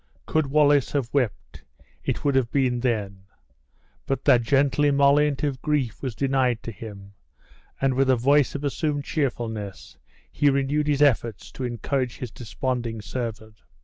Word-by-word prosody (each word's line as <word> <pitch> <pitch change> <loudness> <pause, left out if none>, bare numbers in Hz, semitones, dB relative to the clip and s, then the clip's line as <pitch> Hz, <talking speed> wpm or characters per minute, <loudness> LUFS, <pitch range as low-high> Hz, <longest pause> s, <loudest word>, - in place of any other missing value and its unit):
Could 155 -2 0
Wallace 145 -1 +3
have 135 -5 -2
wept, 125 -8 -2 0.4
it - - -3
would 140 - +3
have 130 -3 +2
been 130 -3 +1
then; 105 -6 -2 0.8
but 135 - -2
that 120 - +6
gentle 140 +4 +2
emollient 140 0 +3
of 135 -3 -1
grief 145 -7 -1
was 130 -5 -4
denied 130 -3 +1
to 115 - -5
him, 100 -1 -10 0.7
and, 135 -1 +2
with 135 +1 +2
a 130 - +5
voice 140 +4 +3
of 145 - -4
assumed 145 0 -1
cheerfulness, 110 - -4 0.3
he 145 - +3
renewed 140 +2 0
his 145 -1 +3
efforts 115 -6 +1
to 130 - -5
encourage 125 +2 -2
his 125 -4 -6
desponding 120 -1 -3
servant. 110 -2 -6
130 Hz, 150 wpm, -24 LUFS, 115-140 Hz, 0.8 s, that